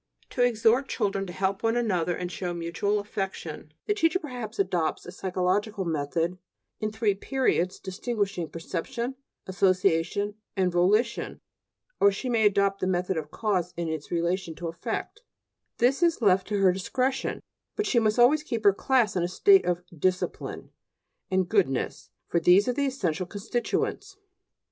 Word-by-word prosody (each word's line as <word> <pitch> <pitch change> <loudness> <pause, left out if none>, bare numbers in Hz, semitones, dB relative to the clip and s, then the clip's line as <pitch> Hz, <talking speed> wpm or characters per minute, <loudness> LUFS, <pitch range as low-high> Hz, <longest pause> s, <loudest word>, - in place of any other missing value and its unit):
To 250 - -1
exhort 240 +2 +3
children 195 -5 -1
to - - -6
help 190 +3 -1
one 225 +1 +1
another 180 -7 0
and 180 0 -4
show 175 -2 -4
mutual 170 +5 -1
affection 190 -7 -5
the 415 - +1
teacher 350 -3 +2
perhaps 245 - -7
adopts 180 -5 0
a 175 - -7
psychological 190 +2 -1
method 165 +3 -1 0.4
in 215 0 -2
three 215 -1 +1
periods 195 -5 0
distinguishing 195 -3 -3
perception, 235 - -4 0.3
association, 190 +1 +1 0.2
and 185 -1 +2
volition; 210 +7 +1 0.6
or 200 - +6
she 250 +6 -4
may 225 -3 +4
adopt 200 -1 +1
the 185 - +1
method 180 0 0
of 155 -2 -4
cause 185 -3 -1
in 170 -1 -2
its 160 -2 -5
relation 170 0 -1
to 170 0 -4
effect; 225 - -5 0.6
this 260 +6 +2
is 340 -2 +3
left 190 -5 +3
to 210 - -1
her 190 -2 +5
discretion; 260 +8 -1 0.4
but 420 - -1
she 245 - +3
must 215 0 +1
always 255 +6 +5
keep 235 -7 -4
her 200 -1 +6
class 240 -1 +2
in 180 - +1
a 175 - +1
state 390 - +5
of 175 0 0
"discipline" 180 +3 -2 0.6
and 185 -1 +1
"goodness," 175 - 0 0.2
for 170 - +1
these 180 +6 +5
are - - +3
its 255 - -4 0.2
essential 180 - -1
constituents. 235 - -3
195 Hz, 160 wpm, -27 LUFS, 180-230 Hz, 0.6 s, or